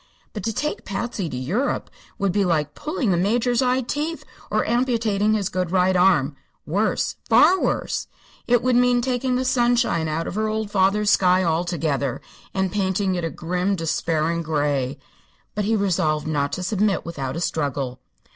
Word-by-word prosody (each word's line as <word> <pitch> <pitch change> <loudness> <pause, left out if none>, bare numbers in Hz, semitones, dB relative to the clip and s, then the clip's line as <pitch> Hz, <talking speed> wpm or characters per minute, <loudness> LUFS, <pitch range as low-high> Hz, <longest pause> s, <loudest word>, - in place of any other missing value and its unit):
But 210 - -5
to 225 - 0
take 300 +7 -3
Patsy 200 -3 -3
to 125 - -5
Europe 185 - -2 0.3
would 200 -1 0
be 200 +2 +1
like 155 -5 0
pulling 300 - -2
the 175 - +2
Major's 235 +6 +1
eye 255 0 +2
teeth 300 +6 -3 0.3
or - - +1
amputating 225 -4 +1
his 200 -3 0
good 185 -2 -2
right 185 +1 +2
arm. 175 -6 +3 0.3
Worse; 200 +8 0
far 375 +1 +6
worse! - - -1 0.4
It 240 -1 +3
would 255 -1 +2
mean 245 0 +4
taking 255 0 0
the 255 +1 0
sunshine 240 -10 +2
out 155 +2 -2
of - - -4
her 215 +2 0
old 215 -1 -2
father's 200 +1 +3
sky 185 0 +4
altogether, 160 -6 -1 0.3
and 190 -1 -1
painting 195 -1 0
it 175 -1 -2
a 165 - -1
grim, 180 +6 -1
despairing 165 0 -1
gray. 145 -4 -1 0.6
But 210 -1 -2
he 225 +2 +2
resolved 160 -7 +1
not 145 -2 -1
to 180 - -3
submit 200 0 0
without 140 -5 -4
a - - -3
struggle. 140 -6 -2
190 Hz, 170 wpm, -23 LUFS, 160-225 Hz, 0.6 s, far